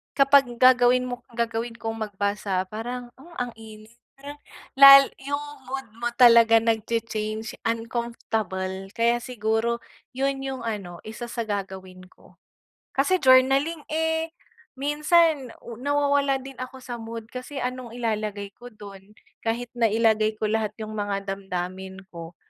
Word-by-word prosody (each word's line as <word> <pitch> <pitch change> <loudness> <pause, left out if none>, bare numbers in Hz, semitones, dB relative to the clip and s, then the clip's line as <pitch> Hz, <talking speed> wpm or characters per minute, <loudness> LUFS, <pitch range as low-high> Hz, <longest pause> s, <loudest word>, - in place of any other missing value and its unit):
kapag 275 0 +5
gagawin 250 0 +5
mo 245 0 -5
gagawin 230 0 -2
kong 225 0 -5
magbasa 200 -1 -2
parang, 240 +3 -6
ah, 335 +5 -15
ang - - -9
init 215 0 -13 0.2
parang 285 +2 -10 0.4
lal 275 0 +10 0.2
yung 285 +1 -2 0.2
mood 270 0 -5
mo 240 - -1
talaga 235 -2 +7
nagcha-change 220 -1 -2
uncomfortable 225 -5 -3
kaya 235 +1 +2
siguro 230 -1 -1 0.3
yun 270 +1 0
yung 265 -2 -5
ano 200 -6 -5
isa 220 +2 -7
sa 235 0 -3
gagawin 190 -3 -6
ko. - - -23 0.6
Kasi 325 +8 +2
journaling, 270 +4 +4
eh, 320 +1 -1 0.4
minsan 295 0 +2
u 235 -1 -9
nawawalan 285 -1 +1
din 270 0 -10
ako 255 0 -8
sa 240 -2 -6
mood 225 0 -7
kasi 255 +3 -6
anong 250 -2 -5
ilalagay 210 -4 -3
ko 245 - -12
don 205 -2 -13 0.2
kahit 235 +1 -3
nailagay 220 -2 +2
ko 215 0 -2
lahat 215 -1 -1
'yong 215 0 -6
mga 205 -1 -2
damdamin 190 0 -5
ko 170 0 -9
230 Hz, 135 wpm, -25 LUFS, 215-265 Hz, 0.6 s, lal